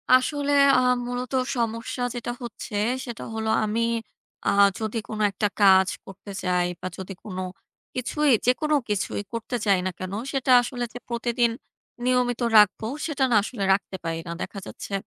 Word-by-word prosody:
আসলে 285 +2 +1 0.3
আ - - +4 0.3
মূলত 250 +1 -4 0.2
সমস্যা 230 +2 -2
যেটা 240 0 -3
হচ্ছে 220 -2 -7 0.3
সেটা 240 -2 -6
হলো 220 0 -2
আমি 215 +2 0 0.7
আ - - +5 0.3
যদি 220 +1 -3
কোন 215 -1 -5
একটা 205 +2 0
কাজ 190 -1 +7 0.2
করতে 200 +1 -10
চাই 180 -1 +2
বা, 185 - -3
যদি 190 +1 -6
কোন 190 -4 -7 0.6
কিছুই 290 +4 0 0.2
যেকোনো 300 +5 +2
কিছুই 205 0 -1
করতে 230 +2 -3
চাই 195 -3 +4
না 185 - 0
কেন, 185 +1 -5 0.2
সেটা 265 -2 0
আসলে 245 0 -4
যে 245 - -7
প্রতিদিন 235 0 +1 0.5
নিয়মিত 250 -1 +1 0.2
রাখবো 210 +1 +5 0.2
সেটা 295 -4 -1
না - - +4
আসলে 215 -3 -4
রাখতে 195 0 -2
পারি 165 0 -2
না। - - -4
দেখা 200 - -5
যাচ্ছে 200 - -8
230 Hz, 160 wpm, -25 LUFS, 200-250 Hz, 0.7 s, কাজ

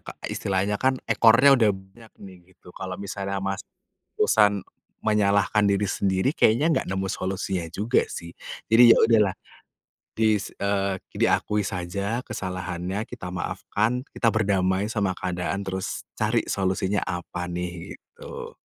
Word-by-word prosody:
Kak, - - -10
istilahnya 100 +1 -1
kan 130 0 +2
ekornya 120 +5 +6
udah 120 -5 +4
banyak 95 +3 -6
nih 95 -2 -12 0.2
gitu. 90 - -16
Kalau 95 0 -6
misalnya 100 0 -4
masih 95 0 -4 0.5
terusan 105 -2 +3 0.4
menyalahkan 105 0 +3
diri 100 +1 +2
sendiri, 95 +4 0
kayaknya 150 +3 +3
nggak - - 0
nemu 95 +1 -2
solusinya 95 -2 -3
juga 105 +9 0
sih. 85 0 -7 0.4
Jadi 120 +1 +8
ya 115 - +8
udahlah 105 -4 +3 0.8
dis 110 -2 +1
eee, 100 -1 0 0.2
diakui 105 0 +1
saja 100 +4 -3
kesalahannya, 90 +3 -4
kita 105 -8 -7
maafkan, 110 +7 -2
kita 115 - 0
berdamai 100 -2 +1
sama 100 -5 0
keadaan, 90 +2 -3
terus 95 -1 -4 0.2
cari - - +1
solusinya 95 +1 0
apa 90 -1 -4
nih, 90 0 -5
gitu. 480 0 -10
100 Hz, 130 wpm, -25 LUFS, 95-110 Hz, 0.8 s, Jadi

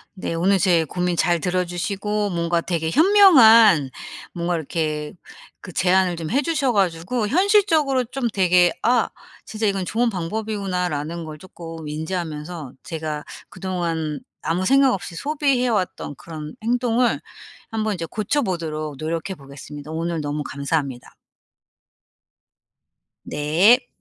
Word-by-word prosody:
네. 185 - -4
오늘 185 +4 +2
제 175 -3 +3
고민 180 +3 -1
잘 170 0 +2
들어 180 +2 0
주시고 200 +4 -2
뭔가 170 0 0
되게 165 -2 -2
현명한 230 - +7 0.4
뭔가 175 0 -1
이렇게 155 -1 -3 0.5
그 185 - -9
제안을 185 0 +2
좀 165 -2 -5
해 270 +5 +3
주셔 300 -5 0
가지고 195 +4 0
현실적으로 325 - +3
좀 250 +1 -3
되게 180 -2 +4
'아 240 0 +2 0.4
진짜 215 0 -2
이건 195 -2 -1
좋은 235 +5 +1
방법이구나.'라는 180 -5 -3
걸 155 -1 -8
쪼끔 165 -2 -10
인지하면서 155 -1 -5
제가 155 -2 -4 0.3
그동안 165 -5 -3 0.2
아무 180 +3 -1
생각 270 +2 +4
없이 175 -2 -5
소비해 280 - 0
왔던 185 -9 -2
그런 155 -2 -8
행동을 245 +1 +1 0.5
한번 220 -2 -1
이제 170 -3 -4
고쳐보도록 170 - -2
노력해 165 +5 -3
보겠습니다. 145 +1 -10
오늘 165 0 -2
너무 145 0 -3
감사합니다. 140 -2 -3 2.1
네. 185 - +3
180 Hz, 280 characters per minute, -22 LUFS, 160-220 Hz, 2.1 s, 현명한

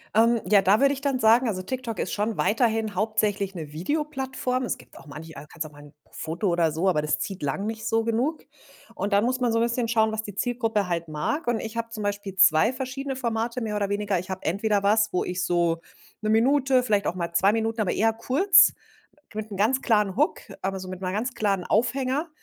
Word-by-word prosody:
Ähm, 230 +1 +4
ja, 200 +1 +5
da 195 +3 +4
würde 275 0 +4
ich 275 - -7
dann 275 -2 0
sagen 235 +2 +5
also, 185 -4 -2
TikTok 245 +1 -4
ist - - -3
schon 215 +2 -1
weiterhin 225 -1 +1
hauptsächlich 205 -1 0
'ne 155 -4 -7
Videoplattform. 265 - -2
Es 245 - -2
gibt - - -18
auch - - -16
manche, 155 +3 -9
äh 150 - -10
kannst 160 -2 -5
auch 155 - -10
mal 145 0 -15
'n 145 0 -15 0.2
Foto 170 +5 -3
oder 170 -2 +2
so, 165 +5 -1
aber 175 -5 +2
das 150 0 0
zieht 195 -2 -5
lang 145 +8 -2
nicht 220 0 -4
so 225 0 +1
genug, 240 +8 -1 0.5
und 200 - -3
dann 200 +1 +4
muss 255 +1 0
man 245 -2 +1
so 230 - +1
'n 230 - +3
bisschen 235 0 0
schauen, 220 -1 +2
was 220 0 -2
die 205 -3 -9
Zielgruppe 225 -3 -1
halt 170 -1 -2
mag 155 - -3
und 240 -2 +1
ich 225 +1 -6
habe 230 0 -2
zum 220 -2 -6
Beispiel 205 -1 -3
2 185 +3 +5
verschiedene 265 +1 -4
Formate 235 -1 -2
mehr 215 -2 -3
oder 200 -1 -1
weniger, 205 -2 0
ich 185 +2 -9
habe 190 0 -5
entweder 200 +3 +1
was, 215 +1 +3
wo 180 - +1
ich 180 0 -3
so 170 -1 +1 0.4
'ne 215 - -1
Minute, 260 +3 +3
vielleicht 210 -4 +1
auch - - -1
mal 170 -2 -4
2 190 +4 +4
Minuten, 225 0 -1
aber 195 - 0
eher 225 +1 +2
kurz 335 - +5 0.6
mit 215 0 -5
'nem 200 - -6
ganz 240 +7 +2
klaren 210 -4 +2
Hook, 295 +6 +1 0.2
aber 195 0 -2
so 185 - -8
mit 185 0 -7
'ner 185 -1 -2
ganz 230 +5 -2
klaren 195 -4 0
Aufhänger, 260 - 0
215 Hz, 235 wpm, -25 LUFS, 190-240 Hz, 0.6 s, ja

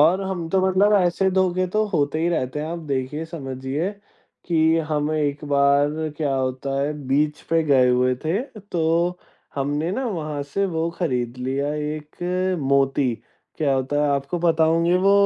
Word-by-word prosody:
और 170 +6 +5
हम 185 -4 -3
तो 190 +2 +2
मतलब 195 +3 +3
ऐसे 190 0 +2
धोखे 185 -1 +1
तो 215 0 +2
होते 155 -6 0
ही 170 +2 +1
रहते 150 -4 -1
हैं। 155 - -3
आप 170 +1 -4
देखिए, 140 +4 -2
समझिए, 140 +2 -4 0.5
कि 160 -1 +3
हम 150 0 0
एक 150 -1 -1
बार 145 +2 +2
क्या 145 -3 0
होता 130 +1 -2
है 145 +2 0 0.2
बीच 150 +2 +1
पे 165 0 +3
गए 135 -4 +4
हुए 125 +1 +3
थे 175 +8 +1 0.3
तो 170 +2 +1 0.4
हमने 145 +4 -1
ना 265 +5 -2
वहाँ 155 -8 -3
से 145 +8 -2
वो 165 -2 -1
खरीद 125 -8 -1
लिया 135 +3 -1
एक 175 +5 -2
मोती। 135 -2 +2 0.4
क्या 140 -3 +2
होता 135 +2 -1
है, 150 - +2
आपको 140 +5 -1
पता 165 -1 +3
होंगे 165 +2 +3
वो 195 +2 +4
155 Hz, 170 wpm, -23 LUFS, 140-175 Hz, 0.5 s, और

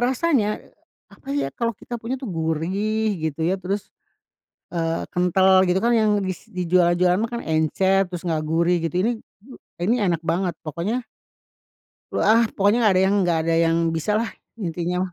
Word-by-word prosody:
rasanya, 255 -2 +2 0.6
apa 270 - -17
ya 285 - -1
kalau 230 -3 -2
kita 240 -1 -7
punya 240 +4 -3
tuh 255 -4 -7
gurih 190 +7 -1 0.2
gitu 160 +2 -4
ya 185 +2 0
terus, 195 +2 -4 0.8
eee, 165 -1 -1
kental, 185 +1 +4
gitu 180 +2 +1
kan 235 - +3
yang 220 -2 +3
bis 185 +3 -5
dijual-jualan 180 -1 +2
mah - - -15
kan 235 - -3
encer, 190 +5 +2
terus 175 -1 -7
nggak 160 -3 -1
gurih 170 +2 +2
gitu. 170 - -6
Ini 230 - +2 0.7
ini 215 +7 +2
enak 170 -2 0
banget! 170 +1 -1
Pokoknya 185 - -3 1.1
ah, 225 +2 +4
pokoknya 205 +4 +2
nggak 215 -3 +5
ada 185 - +4
yang 195 - +2
nggak 170 -2 +1
ada 165 - +2
yang 165 0 +3 0.2
bisa 160 +6 -1
lah 230 - -2 0.3
intinya 180 0 -2
mah. 180 - -13
185 Hz, 165 wpm, -23 LUFS, 170-215 Hz, 1.1 s, nggak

